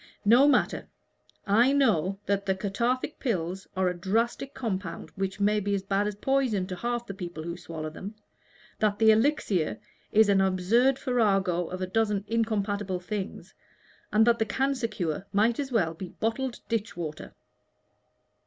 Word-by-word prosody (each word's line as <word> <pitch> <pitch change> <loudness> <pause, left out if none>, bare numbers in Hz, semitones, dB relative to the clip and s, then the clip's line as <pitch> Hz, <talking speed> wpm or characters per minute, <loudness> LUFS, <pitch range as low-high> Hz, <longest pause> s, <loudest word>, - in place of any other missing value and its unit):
No 240 +7 +7
matter: 290 - +2 0.6
I 230 +6 +4
know 195 - +2
that 200 0 -1
the 190 - +2
Cathartic 235 +8 -1
Pills 185 - -2
are 190 -1 +2
a 180 - +1
drastic 225 +9 -1
compound 200 -8 -4
which 195 0 -4
may 210 +1 +3
be 200 0 0
as 195 - -3
bad 200 +1 0
as 210 - -3
poison 245 -4 +1
to 185 -1 -5
half 240 +4 -2
the 200 - -6
people 175 -4 -6
who 170 +1 -4
swallow 160 -3 -6
them; 200 +7 -8 0.6
that 210 -2 +1
the 220 0 +6
Elixir 220 - +1 0.3
is 220 0 +5
an 200 -1 +4
absurd 200 +8 +3
farrago 195 -9 +1
of 185 0 -5
a - - +1
dozen 205 +1 0
incompatible 205 -4 -1
things; 195 +2 -6 0.6
and 220 +1 +5
that 235 0 +3
the 220 - +2
Cancer 265 +2 0
Cure 185 -4 -3
might 225 +5 +2
as 275 -2 -3
well 175 -9 +1
be 180 +2 -7
bottled 235 +6 -3
ditch 225 -3 -2
water." 155 -3 -6
205 Hz, 160 wpm, -27 LUFS, 185-230 Hz, 0.6 s, No